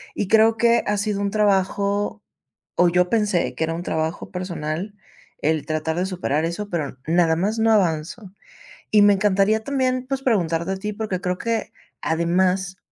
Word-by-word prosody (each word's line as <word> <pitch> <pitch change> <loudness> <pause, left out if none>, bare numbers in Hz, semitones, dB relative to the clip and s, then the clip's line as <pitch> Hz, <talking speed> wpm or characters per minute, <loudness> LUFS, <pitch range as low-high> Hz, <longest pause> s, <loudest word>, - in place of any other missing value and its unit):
Y 195 - -2
creo 220 0 +5
que 235 0 +4
ha 210 0 +1
sido 200 0 -1
un 200 - 0
trabajo 200 0 0 0.5
o 180 - +4
yo 180 +1 +2
pensé 210 -6 +1
que 160 - 0
era 165 - -3
un 170 - -5
trabajo 160 +1 -3
personal, 180 +1 -4 0.4
el 155 -1 0
tratar 155 +1 -2
de 180 - 0
superar 165 -4 -1
eso, 200 +5 -4
pero 155 -7 -3
nada 165 0 +3
más 205 +6 -1
no 225 0 +3
avanzo. 185 +1 0 0.6
Y 210 - +6
me 205 0 +6
encantaría 205 +2 +2
también, 255 -2 -1
pues, 270 0 -2
preguntarte 170 -7 0
a - - -4
ti, 210 +2 -4
porque 205 -3 -3
creo 180 -1 -2
que 230 -1 -2 0.3
además, 180 +3 0
190 Hz, 170 wpm, -22 LUFS, 170-210 Hz, 0.6 s, Y